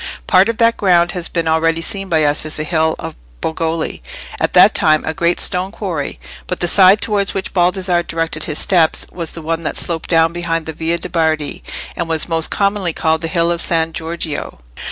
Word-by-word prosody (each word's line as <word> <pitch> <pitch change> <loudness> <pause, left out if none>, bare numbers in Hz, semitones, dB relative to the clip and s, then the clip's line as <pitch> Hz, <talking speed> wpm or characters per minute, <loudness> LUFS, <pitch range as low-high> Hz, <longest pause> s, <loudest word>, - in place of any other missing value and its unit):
Part 190 +3 +4
of 230 - -2
that 230 0 +3
ground 175 -3 +3
has 180 -2 -4
been 170 -2 -2
already 160 +1 +2
seen 195 +3 -4
by 160 -2 +2
us 145 0 +1
as 155 0 -5
the 155 - -2
hill 160 0 +1
of - - -7 0.2
Bogoli, 160 - -2 0.4
at - - 0
that - - +7
time 155 -1 +3
a 160 - -2
great 170 0 0
stone 185 +2 +1
quarry; 170 - -4 0.3
but - - -3
the 175 - 0
side 195 +3 +6
towards 200 -2 -1
which 190 -1 -4
Baldassarre 180 0 +1
directed 165 0 -3
his 155 - -3
steps 170 -4 +2
was 170 -2 -5
the 165 - -4
one 165 +1 -2
that 160 - -3
sloped 165 -2 -2
down 165 -1 +3
behind 165 -2 -2
the 160 - -5
Via 165 +2 -2
de' 180 - -7
Bardi, 160 -3 -1 0.3
and 170 -1 -3
was 160 -1 0
most 165 -1 -1
commonly 200 -4 0
called 160 0 0
the 165 - -2
hill 170 0 +1
of 170 0 0
San 165 -2 +1
Giorgio. 160 - -5
165 Hz, 210 wpm, -17 LUFS, 160-180 Hz, 0.4 s, that